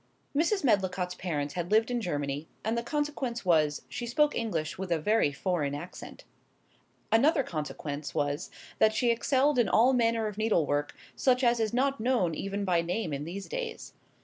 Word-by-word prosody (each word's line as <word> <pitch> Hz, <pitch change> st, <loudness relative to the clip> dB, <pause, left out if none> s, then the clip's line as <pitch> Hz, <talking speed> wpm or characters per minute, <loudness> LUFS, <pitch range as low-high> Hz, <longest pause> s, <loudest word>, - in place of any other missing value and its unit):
Mrs. 345 Hz, +6 st, +2 dB
Medlicott's 190 Hz, -6 st, +1 dB
parents 150 Hz, -6 st, -3 dB
had 175 Hz, -1 st, -3 dB
lived 220 Hz, +3 st, +3 dB
in 240 Hz, -1 st, 0 dB
Germany, 145 Hz, -4 st, -3 dB, 0.2 s
and 220 Hz, +2 st, 0 dB
the 235 Hz, -, 0 dB
consequence 270 Hz, -4 st, -3 dB
was, 155 Hz, -4 st, +2 dB
she 240 Hz, -, -5 dB
spoke 295 Hz, +5 st, +2 dB
English 170 Hz, -10 st, -2 dB
with 185 Hz, -1 st, -6 dB
a 170 Hz, -, +3 dB
very 185 Hz, -1 st, +2 dB
foreign 145 Hz, -2 st, -1 dB
accent. 170 Hz, +5 st, -9 dB, 0.9 s
Another 275 Hz, +6 st, +4 dB
consequence 150 Hz, -, -5 dB
was, 145 Hz, 0 st, -1 dB, 0.3 s
that 220 Hz, 0 st, +4 dB
she 240 Hz, +1 st, +3 dB
excelled 265 Hz, +3 st, +2 dB
in 240 Hz, -, +3 dB
all 245 Hz, +4 st, +5 dB
manner 230 Hz, -2 st, +2 dB
of 210 Hz, -1 st, -4 dB
needlework, 150 Hz, -9 st, +1 dB, 0.2 s
such 255 Hz, 0 st, +2 dB
as 240 Hz, -1 st, +3 dB
is 220 Hz, -2 st, 0 dB
not 270 Hz, +3 st, +1 dB
known 220 Hz, -8 st, +1 dB
even 195 Hz, +4 st, -3 dB
by 175 Hz, -3 st, +2 dB
name 175 Hz, 0 st, -2 dB
in 140 Hz, +1 st, -3 dB
these 195 Hz, +4 st, -6 dB
days. 480 Hz, -2 st, -5 dB
210 Hz, 175 wpm, -29 LUFS, 165-240 Hz, 0.9 s, all